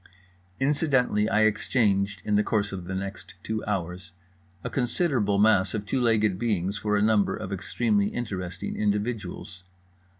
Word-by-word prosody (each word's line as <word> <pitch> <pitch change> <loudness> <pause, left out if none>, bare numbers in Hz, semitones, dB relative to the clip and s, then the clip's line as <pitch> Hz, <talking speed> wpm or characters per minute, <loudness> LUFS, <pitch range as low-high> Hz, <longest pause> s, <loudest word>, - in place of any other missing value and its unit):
Incidentally, 135 -7 +2
I 110 - +3
exchanged 105 -3 +1
(in 105 - 0
the 105 - +4
course 105 -1 0
of 95 -3 -6
the 95 - -4
next 100 -1 -6
two 110 0 -3
hours) 90 -3 -4 0.5
a - - -3
considerable 120 - +1
mass 100 -2 +3
of 105 -1 -3
two 130 +4 -1
legged 110 -5 +2
beings 100 -4 0
for 105 0 0
a 100 - +2
number 110 -2 +3
of 100 -3 -5
extremely 100 +1 0
interesting 95 -6 -4
individuals. 105 -3 -3
105 Hz, 145 wpm, -26 LUFS, 100-110 Hz, 0.5 s, the